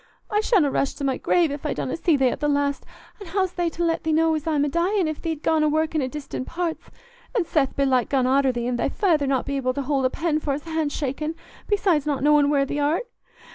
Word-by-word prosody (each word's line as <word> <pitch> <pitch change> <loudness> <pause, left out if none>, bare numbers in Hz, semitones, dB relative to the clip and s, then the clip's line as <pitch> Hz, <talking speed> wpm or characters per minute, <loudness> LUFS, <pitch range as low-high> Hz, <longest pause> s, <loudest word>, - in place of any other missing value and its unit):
I 420 0 +2
shanna 380 - +3
rest 275 - -1
i' 280 - -2
my 265 -1 0
grave 340 -4 +2
if 285 0 -6
I 300 - -2
donna 260 - -3
see 330 -2 +2
thee 265 -2 +3
at - - -4
th' 295 0 0
last; 285 -1 0 0.3
an' 400 - -9
how's 375 +1 0
they 350 -1 0
to 335 +1 -4
let 330 -1 0
thee 320 - -1
know 320 +1 +3
as 310 0 -3
I'm 295 -2 +2
a - - 0
dyin', 345 +5 +1
if 310 -1 -4
thee't 320 -3 -4
gone 320 -1 +2
a 305 - +3
workin' 315 0 0
i' 260 - -1
distant 275 -2 -6
parts, 340 -1 -4 0.5
an' 410 -7 +2
Seth 290 -5 0
belike 265 -3 +2
gone 265 -3 +2
arter 265 +1 +3
thee, 240 -1 -3
and 245 -1 -1
thy - - +1
feyther 320 -9 +1
not 265 -2 0
able 270 -2 -1
to 280 - -2
hold 270 -1 0
a - - +3
pen 320 +1 -1
for's 290 -1 -3
hand 320 -3 -2
shakin', 300 +3 -3 0.3
besides 370 -8 +1
not 280 -3 -1
knowin' 295 -1 +4
where 280 -1 +2
thee 290 +2 -3
art? 305 +10 +1
300 Hz, 250 wpm, -24 LUFS, 275-330 Hz, 0.5 s, knowin